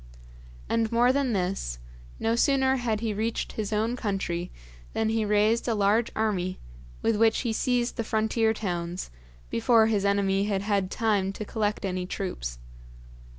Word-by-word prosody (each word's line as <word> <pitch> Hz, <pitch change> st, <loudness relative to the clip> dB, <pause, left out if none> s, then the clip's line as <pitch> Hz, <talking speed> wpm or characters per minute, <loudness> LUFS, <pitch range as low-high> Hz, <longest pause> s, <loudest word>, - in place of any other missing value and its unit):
And 230 Hz, -1 st, 0 dB
more 240 Hz, +2 st, +4 dB
than 275 Hz, -3 st, +1 dB
this, 180 Hz, -, -2 dB, 0.4 s
no 225 Hz, +1 st, +1 dB
sooner 265 Hz, +1 st, +3 dB
had 225 Hz, -4 st, -1 dB
he 225 Hz, -2 st, -1 dB
reached 225 Hz, +3 st, -2 dB
his 215 Hz, -1 st, -4 dB
own 220 Hz, +3 st, 0 dB
country 190 Hz, -6 st, -2 dB, 0.4 s
than 220 Hz, 0 st, 0 dB
he 225 Hz, -1 st, +1 dB
raised 210 Hz, +3 st, +2 dB
a 230 Hz, -, +1 dB
large 210 Hz, +3 st, +2 dB
army, 185 Hz, -4 st, 0 dB, 0.5 s
with 225 Hz, -, +2 dB
which 225 Hz, +1 st, +3 dB
he 235 Hz, -3 st, -1 dB
seized 245 Hz, +1 st, 0 dB
the 230 Hz, -, 0 dB
frontier 220 Hz, +1 st, +1 dB
towns, 175 Hz, -, -3 dB, 0.4 s
before 225 Hz, -, +4 dB
his 215 Hz, -3 st, +1 dB
enemy 200 Hz, 0 st, +2 dB
had 200 Hz, -2 st, -1 dB
had 200 Hz, -3 st, 0 dB
time 205 Hz, -4 st, +1 dB
to 215 Hz, -, -6 dB
collect 210 Hz, -1 st, -1 dB
any 185 Hz, -1 st, -2 dB
troops. -, -, -4 dB
215 Hz, 155 wpm, -27 LUFS, 195-225 Hz, 0.5 s, more